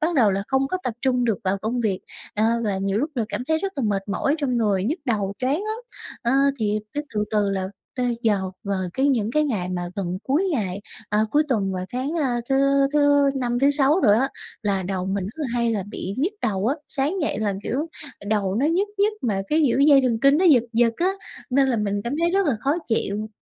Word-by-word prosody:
bắt 325 +3 0
đầu 230 -8 +4
là 195 +1 -1
không 270 0 +2
có 370 - -1
tập 245 - -2
trung 250 -2 +2
được 220 -5 +1
vào 190 +1 +1
công 230 +4 -2
việc, 200 -5 0 0.3
ờ, 215 - +1 0.2
và 205 -3 0
nhiều 195 +1 0
lúc 295 +6 -1
là 235 -4 0
cảm 250 - -4
thấy 315 0 +2
rất 390 +3 -3
là 275 - -1
mệt 195 -1 -1
mỏi 275 +8 +1
trong 260 -5 0
người, 205 -5 +1
nhức 300 - -1
đầu 205 -6 0
choáng 260 +2 +1
lắm. 435 +1 -3 0.4
Ờ, 235 0 +1 0.3
thì 210 -1 0
cái 295 +1 -3
từ 210 0 +1
từ 210 -2 +1
là 190 -1 -2 0.3
tới 245 -2 -1
giờ 200 -4 +1
vào 200 -2 -1
cái 270 +2 +2
những 230 -5 +1
cái 305 +2 +3
ngày 205 -11 -2
mà 180 -1 -2
gần 185 -2 -2
cuối 290 +8 +1
ngày 200 -7 -2 0.3
à, 210 - +1
cuối 300 - +4
tuần 200 -7 0
và 185 -1 -3
sáng, 255 +3 -2
a, 245 -4 0
thứ 270 - +2 0.4
thứ 285 -1 +4
Năm, 245 -2 -1
thứ 275 +2 +4
Sáu 285 +4 +3
đồ 240 - +4
á 255 +5 +3 0.3
là 195 -2 0
đầu 185 0 -3
mình 195 -1 -1
rất 210 +9 -7
là 300 - -1
hay 235 -1 +1
là 205 -3 -1
bị 195 -1 -5
nhức 340 +9 +1
đầu 195 -1 0
á, 270 - +2
sáng 285 +5 +1
dậy 295 - -1
là 210 -2 0
kiểu 285 +7 -2 0.4
đầu 205 -3 0
nó 255 +7 +2
nhức 365 +6 +1
nhức 415 +2 +3
mà 200 -5 0
cái, 310 +1 +3
kiểu, 250 - +1
dây 280 -1 +7
thần 235 -3 +1
kinh 275 +3 +5
nó 370 - +2
giật 275 -10 +6
giật 230 0 +3
á 370 +3 +1 0.4
nên 270 +1 +3
là 245 - +1
mình 205 -1 -1
cảm 240 +4 -2
thấy 340 0 +2
rất 390 0 +2
là 270 -7 +1
khó 280 +5 +1
chịu. 215 -2 -1
240 Hz, 245 wpm, -23 LUFS, 205-280 Hz, 0.4 s, dây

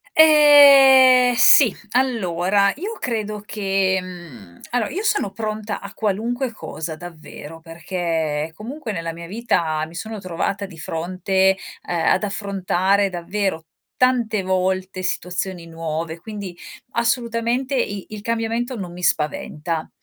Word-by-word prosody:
Ehm, 275 -5 +7
sì. 235 -1 +7 0.2
Allora 200 -6 +1
io 410 +8 -6
credo 215 -3 -3
che, 195 -2 0
mhmm, 155 - -12
allora 240 -3 0
io 400 +5 -4
sono 415 - 0
pronta 215 0 -4
a 200 0 -10
qualunque 230 +5 -2
cosa, 160 -6 -7
davvero, 165 -1 -11
perché 165 -2 -3
comunque 230 - -7
nella 165 -3 -4
mia 170 0 -9
vita 165 -8 -1
mi 165 +2 -14
sono 215 +3 -6
trovata 190 +2 -3
di 175 -4 -13
fronte, 185 +4 0 0.3
ehm, 170 -2 -1
ad - - +3
affrontare, 195 -1 0
davvero, 180 -1 -3 0.4
tante 235 -5 +2
volte 185 0 -1
situazioni 180 -1 -3
nuove, 165 0 -5
quindi 200 -3 -8 0.4
assolutamente 235 +2 -1
i 205 -6 -2
il 215 -1 -8
cambiamento 230 +2 -2
non 180 -3 -6
mi 180 0 -10
spaventa. 155 +1 -1
195 Hz, 125 wpm, -21 LUFS, 170-230 Hz, 0.4 s, Ehm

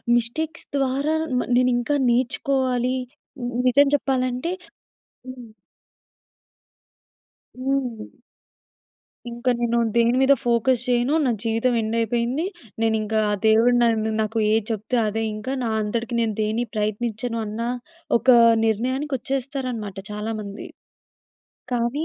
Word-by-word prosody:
Mistakes 310 +8 -2
ద్వారా 275 +3 0 0.2
మ - - +1 0.2
నేనింకా 250 +3 +2
నేర్చుకోవాలి. 255 0 0 0.5
ని 245 0 -2
నిజం 280 +3 +5
చెప్పాలంటే 255 +2 -1 0.8
హ్మ్. 250 -3 -9 2.1
హ్మ్. 255 -5 -2 1.1
ఇంకా 240 +2 -1
నేను 235 0 +1 0.2
దేని 235 +1 +4
మీద 270 +1 +6
ఫోకస్ 235 +1 +2
చేయను. 245 +3 +2
నా 255 - +2
జీవితం 230 +2 +1
ఎండయిపోయింది. 235 - 0 0.4
నేనింకా 220 -1 +1
ఆ - - +1
దేవుడు 225 +3 +5
నన్ను 220 -2 +2
నాకు 220 +1 -2
ఏది 220 -1 +2
చెప్తే 220 +3 -2
అదే 225 +2 -2
ఇంకా 215 +5 -4
నా 235 - -1
అంతటికి 230 +3 -3
నేను 225 -2 0
దేన్ని 215 +3 0
ప్రయత్నించను 220 +2 -2
అన్న 215 +2 -5 0.6
ఒకా 255 0 +5 0.3
నిర్ణయానికొచ్చేస్తారనమాట 255 -1 -2
చాలామంది. 210 -1 -5 1.1
కానీ 245 +5 0
240 Hz, 105 wpm, -23 LUFS, 225-255 Hz, 2.1 s, మీద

